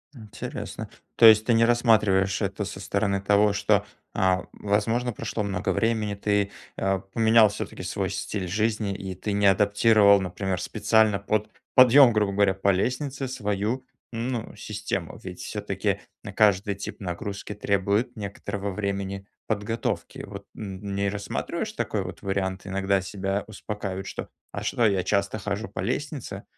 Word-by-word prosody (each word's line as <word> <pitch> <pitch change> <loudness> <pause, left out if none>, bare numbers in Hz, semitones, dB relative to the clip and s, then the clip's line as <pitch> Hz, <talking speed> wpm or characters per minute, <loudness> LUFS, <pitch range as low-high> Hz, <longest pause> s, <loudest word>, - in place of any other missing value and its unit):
Интересно. 105 -3 -7 0.3
То - - +6
есть 110 -1 +8
ты 120 - +3
не 115 0 +5
рассматриваешь 105 -5 +3
это 100 0 -2
со 100 -1 -7
стороны 100 0 0
того, 105 +1 +4
что, 100 0 +2 0.3
а, 95 -3 +2
возможно, 115 +4 0
прошло 105 0 -3
много 95 -1 -2
времени, 110 -3 0
ты, 100 0 0 0.3
э, 95 0 +1
поменял 110 -1 +6
все-таки - - -6
свой - - -2
стиль 95 -3 -3
жизни. 105 +1 0
И 95 -2 -6
ты 100 +2 -3
не 100 0 +3
адаптировал, 100 +1 +5
например, 95 -1 -3
специально 110 -2 +2
под 105 +1 -1 0.3
подъем, 130 0 +8
грубо 105 -2 +2
говоря, 100 -1 +3
по 95 +1 0
лестнице 130 +7 -1
свою, 105 +1 -2 0.3
ну, 115 -1 -3
систему. 105 -4 -4
Ведь - - -8
все-таки - - -2 0.2
на - - -6
каждый 100 -1 +3
тип 100 - -7
нагрузки 100 +3 -5
требует 105 +4 0
некоторого 100 -1 -4
времени 100 0 -3 0.2
подготовки. 110 +1 -2
Вот - - -9
н 100 -1 -6
не 100 0 +1
рассматриваешь 100 0 -3
такой - - -2
вот - - -8
вариант? 95 -1 -2
Иногда 95 0 +1
себя 95 +1 -2
успокаивают: 100 -3 -5
"Что, - - -6 0.2
а - - -4
что, 120 - 0
а - - +6
что, 100 - +2
я 90 - 0
часто 100 +2 0
хожу 105 +2 -3
по - - -9
лестнице? 140 -9 -3
100 Hz, 155 wpm, -26 LUFS, 100-110 Hz, 0.3 s, есть